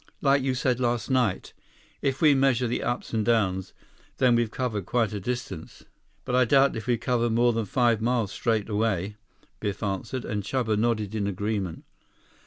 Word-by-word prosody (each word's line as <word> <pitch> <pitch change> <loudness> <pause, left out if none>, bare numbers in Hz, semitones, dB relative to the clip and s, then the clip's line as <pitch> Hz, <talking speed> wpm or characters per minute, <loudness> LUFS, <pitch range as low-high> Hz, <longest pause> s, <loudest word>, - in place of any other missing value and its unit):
"Like 140 0 +3
you 130 -1 0
said 125 -1 0
last 120 0 -1
night. 125 -7 0 0.5
If 135 +2 -1
we 150 -2 +7
measure 135 -2 +2
the 120 - -1
ups 120 0 -3
and 110 -1 +1
downs, 100 -5 +1 0.5
then 125 -2 +4
we've 120 -1 +2
covered 110 -6 -3
quite 115 -3 +1
a 105 - -3
distance. 100 -6 -6 0.4
But 125 - -3
I 130 0 +5
doubt 135 +3 +4
if 110 +2 -6
we've 120 -2 +1
covered 120 -1 0
more 120 +1 +3
than 115 -1 -1
five 115 +1 +2
miles 115 -3 0
straight 110 -3 0
away," 105 -2 -1 0.4
Biff 100 -1 -3
answered, 105 +5 -3
and 105 -2 -2
Chuba 110 +1 -1
nodded 110 -2 0
in 105 -2 -1
agreement. 100 -2 -3
115 Hz, 180 wpm, -26 LUFS, 105-125 Hz, 0.5 s, we